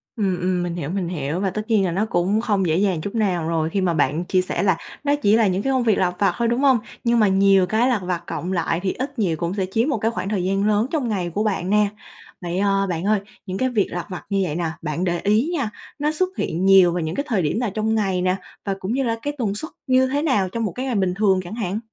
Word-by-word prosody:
Ừm, 195 -6 0
ừm, 180 -1 0
mình 175 -1 -3
hiểu, 160 -4 -4
mình 185 -2 -2
hiểu 155 0 -3
và 195 - 0
tất 215 +3 -3
nhiên 210 -4 +3
là 175 - 0
nó 195 +5 0
cũng 195 +2 +1
không 205 -5 +1
dễ 155 - +2
dàng 190 -4 +1
chút 200 +6 -5
nào 185 -7 0
rồi 160 -1 0
khi 195 +4 -1
mà 180 -2 +1
bạn 165 +1 +1
chia 185 0 +2
sẻ 180 0 -2
là 190 -4 +3 0.3
nó 285 0 +2
chỉ 215 -7 +3
là 225 -2 +4
những 190 +1 0
cái 270 - +1
công 260 -2 +2
việc 220 -3 +3
lặt 180 -1 +1
vặt 200 - +3
thôi, 235 - +1
đúng 240 +2 +1
hông? 270 -3 +5 0.3
Nhưng 235 0 +3
mà 215 - +5
nhiều 195 -1 +4
cái 220 +7 +2
lặt 235 -6 +1
vặt 175 -1 -2
cộng 170 +3 -4
lại 170 -1 0
thì 190 - 0
ít 275 0 -5
nhiều 170 -7 +1
cũng 170 +3 -2
sẽ 195 -2 -1
chiếm 230 +8 +1
một 285 - +1
cái 220 +2 0
khoảng 185 -3 -4
thời 200 -4 -1
gian 195 +2 +1
lớn 215 +3 +2
trong 295 -7 0
ngày 185 -5 -1
của 200 +5 -1
bạn 195 -4 -1
nè. 210 0 +4 0.5
Vậy, 175 +1 -2
ờ, 195 -1 +2
bạn 170 -1 -2
ơi, 210 0 +3 0.3
những 185 -1 -4
cái 260 +3 +1
việc 215 -6 +1
lặt 175 -1 -4
vặt 180 - -7
như 200 -1 +1
vậy 160 -5 -2
nè, 170 0 -1 0.2
bạn 160 +2 -2
để 175 -2 0
ý 215 +9 +2
nha, 275 -10 -1 0.3
nó 295 +1 +1
xuất 365 +4 0
hiện 175 +4 -1
nhiều 190 -2 +7
vào 175 - -1
những 160 +2 -3
cái 280 - -2
thời 220 -8 +1
điểm 160 +8 0
nào 245 - 0
trong 220 +1 0
ngày 190 -4 0
nè? 185 0 +2 0.3
Và 195 - 0
cũng 190 +4 -3
như 270 +1 +1
là 230 -2 0
cái 290 +3 -3
tần 210 -5 -1
suất 315 +10 -6 0.2
như 260 0 +4
thế 285 +2 0
nào 255 - +1
trong 230 +4 -3
một 210 - -1
cái 255 +7 -4
ngày 255 -4 -1
bình 190 -2 +1
thường 195 -1 +2
chẳng 180 +5 -7
hạn? 210 -3 -2
195 Hz, 295 wpm, -22 LUFS, 180-225 Hz, 0.5 s, nhiều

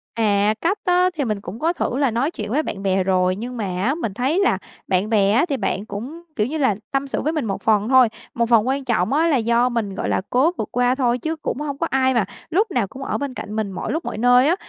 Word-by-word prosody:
À, 210 -2 +2
cách 375 +5 +1
á 360 0 +4
thì 285 - 0
mình 210 -3 -2
cũng 200 +3 -8
có 330 +3 +1
thử 260 - -2
là 275 -3 +2
nói 250 +8 0
chuyện 215 -10 -6
với 300 +5 +1
bạn 195 -8 -5
bè 190 -1 +2
rồi, 185 -1 +2
nhưng 245 +5 -6
mà 215 - -2 0.2
á 265 +7 +1
mình 230 - -3
thấy 265 - 0
là 385 - +3 0.3
bạn 190 +2 +1
bè 200 -3 +3
á 240 +9 +3
thì 280 - 0
bạn 200 -4 -2
cũng, 240 +11 -7
kiểu 210 0 +1
như 310 +5 -3
là, 260 -9 +2 0.2
tâm 275 0 -1
sự - - -2
với 310 - -1
mình 305 -6 -1
một 195 -2 -3
phần 215 +1 +2
thôi, 260 -2 +6 0.3
một 235 -1 0
phần 230 -1 +4
quan 270 +1 0
trọng 235 -2 +1
á 320 +3 +3
là 300 -5 +3
do 235 +1 +2
mình, 220 -5 -2
gọi - - -2
là, - - +1
cố 270 +7 +3
vượt 215 - -2
qua 245 +1 +2
thôi, 245 -3 +1
chứ 320 +5 -2
cũng 310 - -4
hông 290 -2 -4
có 330 - -1
ai 260 0 +2
mà 230 -5 +2 0.2
lúc 390 +6 +1
nào 245 - 0
cũng 265 +7 -9
ở - - -2
bên 285 -2 -4
cạnh 210 -4 -6
mình 215 -2 -2
mọi 185 - -4
lúc 320 +3 -2
mọi - - -4
nơi 245 +3 +5
á. 335 - +3
245 Hz, 280 wpm, -21 LUFS, 210-285 Hz, 0.3 s, thôi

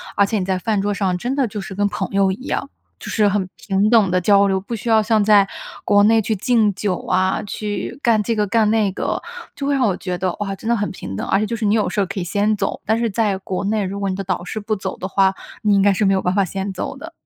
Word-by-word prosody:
而 200 - +4
且 215 +2 -1
你 185 - -2
在 190 -1 -1
饭 210 +2 0
桌 205 +1 0
上 190 -3 0
真 245 +8 -2
的 275 -3 +1
就 210 0 -6
是， 195 -1 -7
跟 205 +1 +1
朋 - - -3
友 195 -1 +2
一 225 +8 -7
样， 275 - -2 0.3
就 - - -8
是 210 -2 +2
很 195 -2 0
平 200 +1 +1
等 215 -5 +4
地 180 0 +2
交 200 +2 +4
流， 190 -1 0
不 230 +5 -5
需 235 +2 -8
要 220 -1 +5
像 220 0 +2
在 205 -1 +5 0.4
国 205 0 +4
内 225 +1 +5
去 220 - -1
敬 220 0 +2
酒 195 -2 -1
啊， 185 +1 +1
去 210 +4 -5
干 225 -3 +3
这 230 - 0
个 210 -1 0
干 215 +1 +2
那 220 -2 +2
个， - - -2 0.3
就 280 -1 -4
会 285 - +2
让 260 -2 +2
我 190 - 0
觉 180 -2 -4
得， 180 0 -1
哇， 195 -1 -3
真 220 +4 -6
的 235 - +3
很 205 -1 -1
平 95 - -7
等。 - - -4
而 - - +2
且 215 - 0
就 230 - -3
是 220 - -2
你 205 +1 +3
有 215 - +1
事 - - -2
儿 - - +1
可 200 +3 -8
以 - - -2
先 205 +5 +1
走， - - -2
但 220 +1 +2
是 235 -1 0
在 205 -2 0
国 190 0 -4
内， 210 +1 0
如 195 +1 -4
果 200 -1 -1
你 185 - -2
的 195 - -4
导 185 -2 -2
师 215 - -4
不 215 +1 -1
走 190 -1 -4
的 185 - -4
话， 190 0 +3 0.3
你 210 -1 +3
应 200 - +4
该 200 +1 +5
是 205 +2 +1
没 195 - +4
有 190 - +1
办 180 - 0
法 200 -2 +3
先 195 +2 -4
走 190 - -4
的。 330 +5 -9
205 Hz, 320 characters per minute, -20 LUFS, 190-220 Hz, 0.4 s, 要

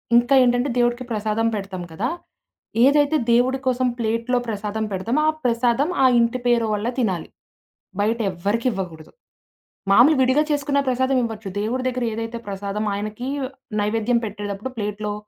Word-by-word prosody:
ఇంకా 240 +3 +4
ఏంటంటే, 245 +2 +2
దేవుడికి 240 +1 +1
ప్రసాదం 215 +1 0
పెడతాం 195 -3 -5
కదా! 195 +9 -2 0.8
ఏదైతే 290 +2 +4
దేవుడి 250 +3 +3
కోసం 255 0 +2
ప్లేట్‌లో 230 +2 0
ప్రసాదం 215 0 -3
పెడతామో, 225 +10 0
ఆ - - +3
ప్రసాదం 240 +4 +2
ఆ - - +7
ఇంటి 235 +2 +1
పేరువాళ్లు 225 -2 +1
తినాలి. 190 -8 -1 0.7
బయటెవ్వరికి 210 +1 0
ఇవ్వకూడదు. 180 -6 -6 0.8
మామూలుగా 265 +8 +6
విడిగా 260 +4 +3
చేసుకున్న 285 -1 +1
ప్రసాదం 260 +1 +1
ఇవ్వచ్చు. 220 -3 -5
దేవుడి 235 +5 -1
దగ్గర 255 -1 -2
ఏదైతే 225 +1 -4
ప్రసాదమో, 200 +2 -3
ఆయనకి 215 +4 -5 0.5
నైవేద్యం 225 +3 +1
పెట్టేటప్పుడు 205 +3 -5
ప్లేట్‌లో 210 0 -3
230 Hz, 130 wpm, -22 LUFS, 210-250 Hz, 0.8 s, ఆ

